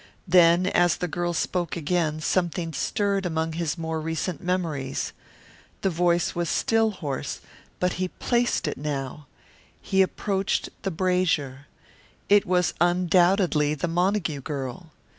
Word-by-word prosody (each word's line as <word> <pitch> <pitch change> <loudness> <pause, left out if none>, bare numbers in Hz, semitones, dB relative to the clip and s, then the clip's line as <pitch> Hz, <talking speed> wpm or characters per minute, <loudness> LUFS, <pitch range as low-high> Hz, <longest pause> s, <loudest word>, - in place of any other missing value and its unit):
Then 175 0 +5
as 175 -2 +3
the 180 - -2
girl 175 +1 -2
spoke 175 +1 -1
again 155 -1 0
something 170 -1 -1
stirred 200 +2 0
among 160 -2 -1
his 165 -1 -2
more 160 -1 -3
recent 160 +1 -3
memories. 165 -7 -2 0.7
The 195 - +1
voice 175 0 +1
was 170 -1 -2
still 225 0 +2
hoarse, 150 -10 -4 0.4
but 180 0 +1
he 185 - +1
placed 240 +5 0
it - - -3
now. 145 0 -4 0.5
He 190 0 +1
approached 195 +1 0
the 195 - -1
brazier. 160 -7 0 0.6
It 205 -1 +5
was 180 -1 +2
undoubtedly 175 -3 +3
the 155 - -2
Montague 175 -3 0
girl. 140 +4 -5
175 Hz, 130 wpm, -25 LUFS, 155-185 Hz, 0.7 s, Then